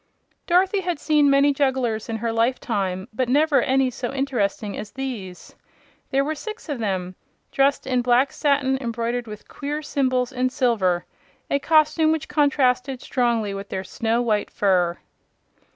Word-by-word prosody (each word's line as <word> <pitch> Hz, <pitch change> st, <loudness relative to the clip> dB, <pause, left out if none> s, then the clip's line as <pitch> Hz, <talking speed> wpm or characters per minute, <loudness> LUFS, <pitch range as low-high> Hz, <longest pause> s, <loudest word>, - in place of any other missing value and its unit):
Dorothy 375 Hz, +3 st, +3 dB
had 350 Hz, -3 st, -2 dB
seen 300 Hz, -1 st, +3 dB
many 280 Hz, +1 st, +4 dB
jugglers 260 Hz, -6 st, 0 dB
in 225 Hz, -, -2 dB
her 230 Hz, +1 st, -2 dB
lifetime, 220 Hz, -5 st, -1 dB
but 250 Hz, +2 st, -1 dB
never 295 Hz, +2 st, +3 dB
any 265 Hz, -1 st, +2 dB
so 245 Hz, 0 st, -4 dB
interesting 240 Hz, -7 st, -2 dB
as 210 Hz, -, -6 dB
these. 230 Hz, -9 st, -7 dB, 0.6 s
There 275 Hz, +1 st, +1 dB
were 310 Hz, -, -1 dB
six 430 Hz, +4 st, -8 dB
of 285 Hz, -4 st, -3 dB
them, 185 Hz, -4 st, -2 dB, 0.4 s
dressed 275 Hz, +1 st, +2 dB
in 255 Hz, -1 st, +1 dB
black 250 Hz, +3 st, +3 dB
satin 275 Hz, -2 st, +1 dB
embroidered 235 Hz, 0 st, -2 dB
with 210 Hz, -1 st, -10 dB
queer 295 Hz, +2 st, -5 dB
symbols 255 Hz, -3 st, 0 dB
in 255 Hz, 0 st, 0 dB
silver 215 Hz, -10 st, +1 dB, 0.5 s
a 280 Hz, -, +2 dB
costume 310 Hz, +2 st, +3 dB
which 320 Hz, -3 st, -2 dB
contrasted 270 Hz, -3 st, +1 dB
strongly 235 Hz, -6 st, 0 dB
with 195 Hz, 0 st, -7 dB
their 190 Hz, -, -3 dB
snow 230 Hz, +5 st, -1 dB
white 210 Hz, -3 st, 0 dB
fur. 180 Hz, -4 st, +1 dB
255 Hz, 150 wpm, -23 LUFS, 225-280 Hz, 0.6 s, many